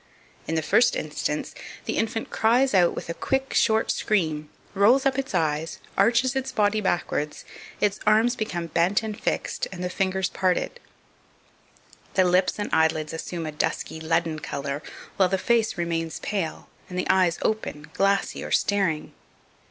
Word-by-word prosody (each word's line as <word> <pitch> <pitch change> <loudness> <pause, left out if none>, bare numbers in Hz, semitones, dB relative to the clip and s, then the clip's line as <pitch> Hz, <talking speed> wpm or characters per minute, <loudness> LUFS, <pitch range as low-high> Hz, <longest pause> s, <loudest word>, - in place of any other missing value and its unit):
In 165 - -1
the 160 - 0
first 240 0 +4
instance, 150 0 -3 0.3
the - - -2
infant 225 0 -2
cries 245 +4 +3
out 180 -3 +4
with - - -6
a 170 - -3
quick, 270 +8 -1
short 220 -1 +3
scream, 155 -8 0 0.2
rolls 230 +7 +4
up 270 0 +2
its 270 -1 -3
eyes, 155 0 0 0.2
arches 235 +6 +3
its 265 0 -2
body 210 0 +2
backwards, 175 -5 -1 0.3
its 205 -1 +1
arms 220 +3 +4
become 175 -7 -3
bent 170 +6 +1
and 215 -1 -4
fixed, - - -1
and 180 -1 -6
the 180 - -2
fingers 190 0 0
parted; 185 - -1 1.4
the 190 - +5
lips 180 +1 +2
and 205 - -3
eyelids 160 -1 +2
assume 165 +1 -4
a 155 - -3
dusky 150 +1 -2
leaden 160 0 0
colour, 140 0 -4 0.4
while 190 -2 +4
the 190 - +1
face 225 +1 +1
remains 165 -2 -2
pale, 190 -6 -3 0.2
and 180 - -6
the 180 - 0
eyes 180 -3 +3
open, 155 -8 -2
glassy, 195 0 +1
or - - -6
staring. 190 -7 +1
185 Hz, 160 wpm, -25 LUFS, 160-220 Hz, 1.4 s, the